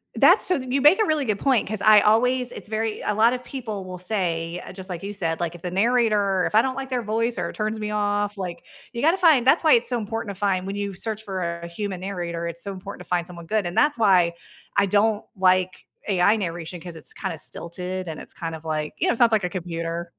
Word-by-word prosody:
That's - - +6
so 365 - +3
th 255 - -7
you 270 +2 +1
make 300 +10 +6
a - - +3
really 310 -4 +1
good 210 -4 -1
point, 265 -5 +2
'cause 215 -2 -2
I 215 -1 +7
always 250 +3 +2
it's - - -9
very 220 0 -2
a - - +1
lot 225 +3 +5
of 250 0 -4
people 220 -8 -6
will 185 0 -7
say 175 -3 -2
uh, - - -9
just 190 0 -8
like 175 -1 -5
you 200 +1 -5
said, 165 -5 -2
like, 170 0 -2
"If 175 - -12
the 180 - -4
narrator 205 -2 +2
if - - -3
I 220 - +6
don't 260 0 -2
like 270 -1 -5
their 250 -2 -1
voice 230 +2 -1
or - - -1
it - - -7
turns 215 0 -2
me 210 0 -3
off," 205 0 -1
like, 180 -3 -6 0.3
you 235 - -5
gotta 325 +5 +4
find 315 -9 +4
that's 310 - +5
why 315 - +5
it's 235 0 +3
so 245 - 0
important 220 -2 -4
to - - -13
find 190 -2 0
when 195 - -4
you 200 0 -3
search 220 +3 -3
for 175 -4 -4
a 170 - -6
human 185 +1 -5
narrator, 175 -3 -4
it's 170 0 -5
so 200 -1 -4
important 185 -1 -9
to - - -21
find 175 -1 0
someone 170 -1 -10
good, 210 +2 0
and 175 +1 -4
that's 295 -3 +3
why 185 -6 +4 0.4
I 200 0 +4
don't 210 +2 +2
like 185 0 +2 0.2
AI 195 +3 +4
narration, 175 -3 -4
'cause 175 -1 -8
it's 155 - -10
kinda 175 -4 -4
stilted 180 +4 -3
and 155 - -6
it's - - -8
kind 165 -1 -5
of 160 0 -12
like, 155 -1 -3
you - - 0
know, - - +3
sounds 235 -1 +4
like 215 -4 +2
a 180 - -1
computer. 170 -1 -4
200 Hz, 260 wpm, -24 LUFS, 180-225 Hz, 0.4 s, I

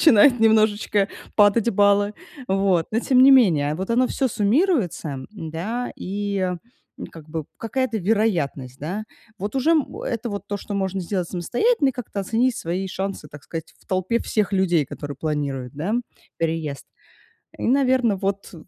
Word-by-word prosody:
начинают 245 -3 +6
немножечко 215 -2 +3 0.3
падать 205 +2 +4
баллы. 205 0 +3 0.3
Вот. 190 -3 +2
Но 225 - +1
тем 255 0 +4
не 270 - +8
менее, 160 - +5
вот 190 +6 -4
оно 250 +2 +3
всё 265 0 0
суммируется. 210 - +1
Да, 205 +6 -4
и, 200 +1 -3 0.6
м, - - -6
как 160 -2 -13
бы 160 -1 -4
какая-то 230 0 -1
вероятность, 170 - 0
да. 185 +8 -4 0.3
Вот 205 +7 -4
уже, 265 +5 +2
м, 310 -4 +1
это 235 -1 -3
вот 200 - -5
то, 205 - -3
что 205 - -8
можно 190 -1 -1
сделать 180 -1 -2
самостоятельно, 275 - +1
и - - -11
как-то 235 -5 -5
оценить 230 +5 +1
свои 180 +3 -3
шансы, 190 -5 -4
так 145 -1 -12
сказать, 165 -1 -7
в - - -26
толпе 185 +5 0
всех 205 -2 0
людей, 175 -6 +2
которые 145 +1 -7
планируют, 140 -4 -3
да, 175 +9 -2 0.4
переезд. 160 -4 -2 0.7
И, - - -6
наверно, 255 -4 +3
вот 195 +1 -3
200 Hz, 155 wpm, -23 LUFS, 170-230 Hz, 0.7 s, не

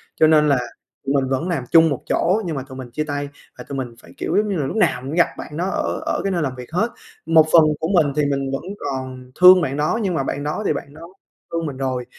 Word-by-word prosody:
cho 155 - +4
nên 150 -1 +4
là 140 -2 +3 0.5
tụi 135 - 0
mình 135 -2 +1
vẫn 135 +6 -1
làm 160 -8 -1
chung 165 0 +6
một 140 - -3
chỗ 190 +6 +2
nhưng 165 -3 -3
mà 135 - -4
tụi 130 -1 -11
mình 125 -2 -8
chia 155 - -2
tay. 145 -1 -4 0.3
Và - - -8
tụi 140 - -6
mình 125 -3 -5
phải, - - -16
kiểu, - - -1
giống 210 0 +1
như 200 - -1
là, 145 - -1
lúc 135 - -4
nào 125 - +2
mình 130 - -7
cũng 160 - -4
gặp 170 - +5
bạn 150 - -8
đó 175 - -1
ở - - -2
ở - - -1
cái 195 - -1
nơi 175 -2 0
làm 135 -4 -2
việc 125 +1 -10
hết. 205 +8 0 0.4
Một 160 -1 +5
phần 165 - +9 0.2
của 160 - -2
mình 155 -6 +3
thì 150 - +2
mình 135 -1 -2
vẫn 135 - -3 0.2
còn 130 -1 -6
thương 180 0 +9
bạn 140 -4 -2
đó 150 +9 0
nhưng 190 -3 0
mà 155 - 0
bạn 140 +1 -3
đó 150 +8 -3
thì - - +2
bạn 140 - -7
đó 155 - -13 0.5
thương 165 -1 -1
mình 140 -4 -5
rồi, 130 -2 -2
150 Hz, 290 wpm, -21 LUFS, 135-165 Hz, 0.5 s, phần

